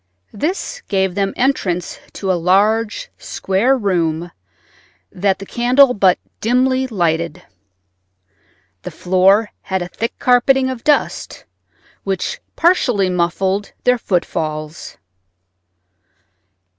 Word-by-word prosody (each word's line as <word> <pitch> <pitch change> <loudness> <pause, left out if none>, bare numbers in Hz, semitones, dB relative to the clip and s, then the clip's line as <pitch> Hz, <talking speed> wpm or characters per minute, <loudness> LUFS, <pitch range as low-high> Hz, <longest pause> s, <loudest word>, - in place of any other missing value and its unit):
This 370 - -3
gave 190 -2 0
them 195 0 0
entrance 190 -10 -1
to 190 -2 -2
a - - +3
large, 210 - +1
square 220 +8 0
room 175 -5 -1 0.8
that 190 +1 0
the 195 - -9
candle 250 +4 +4
but 190 -4 +3 0.2
dimly 255 +3 +1
lighted. 170 -5 -1 1.4
The - - -6
floor 190 +4 +2
had 190 -1 -2
a - - -6
thick 230 +6 -4
carpeting 260 +1 +3
of 245 -3 -7
dust, 295 -1 0 0.6
which 195 -2 -3 0.2
partly 245 - +2
muffled 190 +3 -1
their 250 0 +3
footfalls. 155 -5 -3
195 Hz, 100 wpm, -18 LUFS, 180-250 Hz, 1.4 s, candle